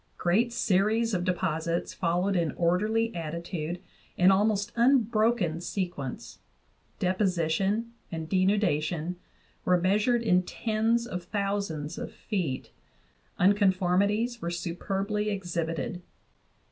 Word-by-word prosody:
Great 220 Hz, +8 st, +2 dB
series 220 Hz, +1 st, +2 dB
of 180 Hz, -2 st, 0 dB
de 185 Hz, -, +2 dB
posits 170 Hz, -1 st, -2 dB
followed 180 Hz, +3 st, 0 dB
in 170 Hz, -4 st, +1 dB
orderly 215 Hz, +7 st, +1 dB
attitude 170 Hz, 0 st, -4 dB, 0.4 s
and 180 Hz, +2 st, +6 dB
almost 205 Hz, +2 st, +2 dB
unbroken 230 Hz, -, +3 dB
se 185 Hz, +1 st, -1 dB
quence; 135 Hz, -3 st, -7 dB, 0.6 s
deposition 190 Hz, +3 st, 0 dB, 0.2 s
and 160 Hz, -2 st, -4 dB
denudation 180 Hz, -3 st, +1 dB, 0.5 s
were 180 Hz, -1 st, +3 dB
measured 210 Hz, +6 st, +2 dB
in 180 Hz, -5 st, +4 dB
tens 225 Hz, +4 st, 0 dB
of 180 Hz, -7 st, -4 dB
thousands 200 Hz, -7 st, -2 dB
of -, -, -5 dB
feet; 175 Hz, -, -3 dB, 0.7 s
unconformities 200 Hz, +4 st, +2 dB
were 170 Hz, -, -2 dB
superbly 195 Hz, +5 st, -2 dB
exhibited. 175 Hz, 0 st, -3 dB
190 Hz, 105 wpm, -28 LUFS, 170-215 Hz, 0.7 s, and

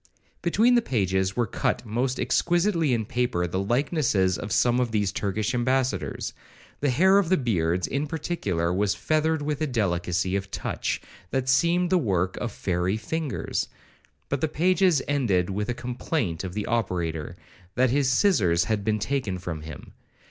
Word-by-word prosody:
Between 220 Hz, +8 st, +3 dB
the 240 Hz, -, +5 dB
pages 95 Hz, -, 0 dB
were 120 Hz, -, +1 dB
cut 120 Hz, -, -1 dB
most 125 Hz, +4 st, -1 dB
exquisitely 175 Hz, -3 st, +2 dB
in 115 Hz, -3 st, 0 dB
paper 120 Hz, -6 st, 0 dB
the 90 Hz, +2 st, -2 dB
likenesses 120 Hz, -, +1 dB
of 105 Hz, -, -6 dB
some 120 Hz, 0 st, +3 dB
of 125 Hz, -1 st, +1 dB
these 105 Hz, -3 st, 0 dB
Turkish 105 Hz, +4 st, -2 dB
ambassadors; 130 Hz, +1 st, -1 dB, 0.5 s
the 145 Hz, -, +1 dB
hair 190 Hz, +10 st, +5 dB
of 185 Hz, -5 st, 0 dB
the 185 Hz, -, +4 dB
beards, 90 Hz, -, 0 dB
in 140 Hz, +3 st, -2 dB
particular, 100 Hz, -, -2 dB
was 95 Hz, 0 st, +1 dB
feathered 155 Hz, 0 st, 0 dB
with 150 Hz, 0 st, -2 dB
a 155 Hz, -, +1 dB
delicacy 90 Hz, -5 st, 0 dB
of 95 Hz, 0 st, -3 dB
touch -, -, -3 dB, 0.3 s
that 130 Hz, +3 st, -1 dB
seemed 170 Hz, +7 st, +3 dB
the 185 Hz, -, +4 dB
work 95 Hz, -, 0 dB
of 120 Hz, -, -3 dB
fairy 90 Hz, +1 st, -1 dB
fingers,—but 140 Hz, 0 st, -5 dB
the 160 Hz, -, +2 dB
pages 180 Hz, -1 st, +2 dB
ended 100 Hz, -11 st, +1 dB
with 105 Hz, +3 st, -2 dB
a 120 Hz, -, -1 dB
complaint 120 Hz, -, -2 dB
of 90 Hz, -1 st, -6 dB
the 105 Hz, -, -2 dB
operator, 85 Hz, -8 st, -2 dB, 0.4 s
that 130 Hz, 0 st, +3 dB
his 140 Hz, -1 st, +2 dB
scissars 100 Hz, -, +3 dB
had 105 Hz, +1 st, -1 dB
been 110 Hz, +1 st, +1 dB
taken 105 Hz, -4 st, -2 dB
from 85 Hz, -3 st, -5 dB
him. 75 Hz, -3 st, -10 dB
120 Hz, 160 wpm, -26 LUFS, 95-145 Hz, 0.5 s, the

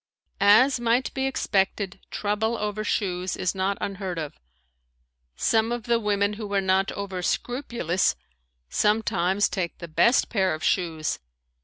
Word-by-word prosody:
As 220 Hz, +7 st, +5 dB
might 240 Hz, +2 st, +1 dB
be 265 Hz, 0 st, 0 dB
expected 195 Hz, -5 st, 0 dB
trouble 215 Hz, +3 st, -1 dB
over 210 Hz, 0 st, -2 dB
shoes 185 Hz, -3 st, -1 dB
is 185 Hz, -, 0 dB
not 190 Hz, +1 st, -1 dB
unheard 190 Hz, -3 st, -4 dB
of. 155 Hz, -3 st, -4 dB, 1.0 s
Some 225 Hz, +1 st, +2 dB
of 240 Hz, -1 st, -2 dB
the 235 Hz, -1 st, +2 dB
women 205 Hz, -1 st, +1 dB
who 210 Hz, -1 st, -6 dB
are -, -, +4 dB
not 190 Hz, 0 st, +2 dB
over 195 Hz, -2 st, -4 dB
scrupulous 235 Hz, -, 0 dB, 0.5 s
sometimes 205 Hz, -, +2 dB
take 175 Hz, -3 st, -3 dB
the 170 Hz, -, -8 dB
best 235 Hz, -, +3 dB
pair 190 Hz, -6 st, +1 dB
of 155 Hz, -, -10 dB
shoes. 160 Hz, -4 st, 0 dB
200 Hz, 140 wpm, -25 LUFS, 185-225 Hz, 1.0 s, As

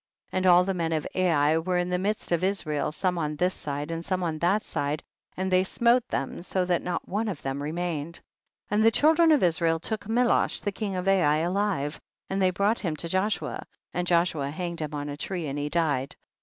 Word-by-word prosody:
45. -, -, -2 dB
And 185 Hz, -, +1 dB
all 180 Hz, 0 st, +7 dB
the 195 Hz, +1 st, -1 dB
men 165 Hz, -2 st, -1 dB
of 155 Hz, -2 st, -1 dB
Ai 160 Hz, -4 st, +3 dB
were 180 Hz, +2 st, -1 dB
in 180 Hz, 0 st, -1 dB
the 180 Hz, -, +1 dB
midst 205 Hz, +1 st, -2 dB
of 170 Hz, 0 st, +1 dB
Israel, 165 Hz, -8 st, -1 dB
some 180 Hz, +2 st, -1 dB
on 150 Hz, -1 st, -2 dB
this 180 Hz, +5 st, +1 dB
side 145 Hz, +2 st, -4 dB
and 165 Hz, 0 st, -4 dB
some 185 Hz, 0 st, -1 dB
on 160 Hz, -2 st, -2 dB
that 195 Hz, +6 st, +2 dB
side, 145 Hz, +2 st, -2 dB, 0.3 s
and 190 Hz, 0 st, -1 dB
they 185 Hz, 0 st, +4 dB
smote 235 Hz, +5 st, +2 dB
them 135 Hz, -, -3 dB
so 185 Hz, +1 st, -1 dB
that 180 Hz, -1 st, +1 dB
not 175 Hz, -1 st, -3 dB
one 210 Hz, +4 st, -1 dB
of 190 Hz, -8 st, -5 dB
them 135 Hz, +1 st, -3 dB
re 145 Hz, -, -3 dB
mained. 170 Hz, -2 st, -3 dB
46. -, -, -19 dB, 0.5 s
And 210 Hz, +1 st, +3 dB
the 225 Hz, -, +7 dB
children 320 Hz, +6 st, +4 dB
of 295 Hz, -8 st, +4 dB
Israel 165 Hz, -1 st, +2 dB
took 210 Hz, +4 st, -3 dB
Melosh 240 Hz, +2 st, +2 dB
king 200 Hz, -3 st, -3 dB
of 180 Hz, +1 st, -3 dB
Ai 175 Hz, -6 st, +4 dB
alive, 175 Hz, -3 st, -1 dB, 0.3 s
and 195 Hz, 0 st, 0 dB
they 185 Hz, -, +4 dB
brought 200 Hz, +5 st, +1 dB
him 165 Hz, -6 st, -2 dB
to 170 Hz, -, -4 dB
Joshua, 190 Hz, +5 st, -1 dB, 0.3 s
and 180 Hz, 0 st, -2 dB
Joshua 170 Hz, -5 st, +2 dB
hanged 170 Hz, +2 st, -4 dB
him 150 Hz, -1 st, -4 dB
on 145 Hz, 0 st, -4 dB
a 145 Hz, -, -4 dB
tree 175 Hz, +2 st, -3 dB
and 145 Hz, 0 st, -3 dB
he 145 Hz, +1 st, -2 dB
died. 145 Hz, -5 st, 0 dB
175 Hz, 225 wpm, -27 LUFS, 155-190 Hz, 0.5 s, all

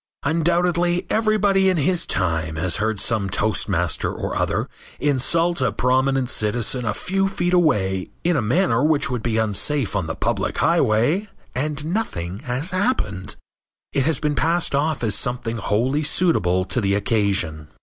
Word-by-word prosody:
Undoubtedly 175 Hz, +3 st, +1 dB
everybody 205 Hz, -3 st, +3 dB
in 185 Hz, -, +1 dB
his 170 Hz, +4 st, +1 dB
time 80 Hz, -3 st, -1 dB
has 85 Hz, +1 st, -1 dB
heard 110 Hz, 0 st, -1 dB
some 100 Hz, -2 st, 0 dB
toastmaster 110 Hz, +2 st, 0 dB
or -, -, -4 dB
other -, -, 0 dB, 0.3 s
insult 165 Hz, +4 st, +1 dB
a -, -, +2 dB
prominent 130 Hz, +1 st, +1 dB
citizen 120 Hz, +2 st, -1 dB
a 105 Hz, -, 0 dB
few 195 Hz, +6 st, 0 dB
feet 175 Hz, -2 st, -1 dB
away 100 Hz, -, +1 dB
in 175 Hz, 0 st, +2 dB
a 145 Hz, -, +1 dB
manner 120 Hz, -, +1 dB
which 155 Hz, -2 st, +2 dB
would 125 Hz, -3 st, -2 dB
be 110 Hz, -1 st, -1 dB
unsafe 110 Hz, +3 st, 0 dB
on 95 Hz, -5 st, -1 dB
the 80 Hz, -, -3 dB
public -, -, -2 dB
highway 135 Hz, -, +2 dB, 0.3 s
and 145 Hz, +3 st, -2 dB
nothing 100 Hz, -, -3 dB
has 135 Hz, -, -2 dB
happened. 185 Hz, -, -1 dB, 0.6 s
It 135 Hz, -, +1 dB
has 155 Hz, -3 st, +1 dB
been 150 Hz, -1 st, 0 dB
passed 165 Hz, +6 st, +1 dB
off 145 Hz, -2 st, 0 dB
as 110 Hz, -3 st, +1 dB
something 120 Hz, 0 st, -1 dB
wholly 120 Hz, +8 st, 0 dB
suitable 115 Hz, -, +2 dB
to 120 Hz, -, -1 dB
the 100 Hz, -1 st, +1 dB
occasion. 100 Hz, -7 st, -1 dB
130 Hz, 155 wpm, -22 LUFS, 105-170 Hz, 0.6 s, everybody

